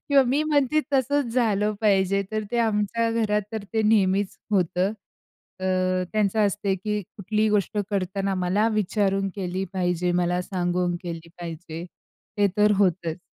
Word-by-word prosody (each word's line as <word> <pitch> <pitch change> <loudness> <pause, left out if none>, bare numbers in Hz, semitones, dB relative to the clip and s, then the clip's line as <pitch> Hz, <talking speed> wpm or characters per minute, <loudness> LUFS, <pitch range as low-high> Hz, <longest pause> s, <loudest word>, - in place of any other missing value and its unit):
किंवा 280 -1 +7
मी 275 +5 +2
म्हणते 300 -1 +2
तसंच 270 -1 +1
झालं 215 -4 +2
पाहिजे. 200 -2 +3
तर 215 0 -1
ते 240 - 0
आमच्या 230 +1 +1
घरात 210 -2 +1
तर 220 -2 -4
ते 220 -1 +1
नेहमीच 200 -2 +2
होतं. 185 0 +1 0.7
अ, 185 -1 +1
त्यांचं 215 0 +1
असते, 200 0 -1
की 210 +2 -2 0.2
कुठलीही 215 +2 0
गोष्ट 210 0 0
करताना 195 0 -1
मला 185 +4 +1
विचारून 195 -1 +1
केली 190 0 -2
पाहिजे, 180 -1 0
मला 175 +1 0
सांगून 180 -1 -1
केली 170 -1 -6
पाहिजे. 165 0 -7 0.5
ते 205 -1 +4
तर 210 0 +5
होतंच. 175 -4 +1
200 Hz, 145 wpm, -25 LUFS, 185-215 Hz, 0.7 s, किंवा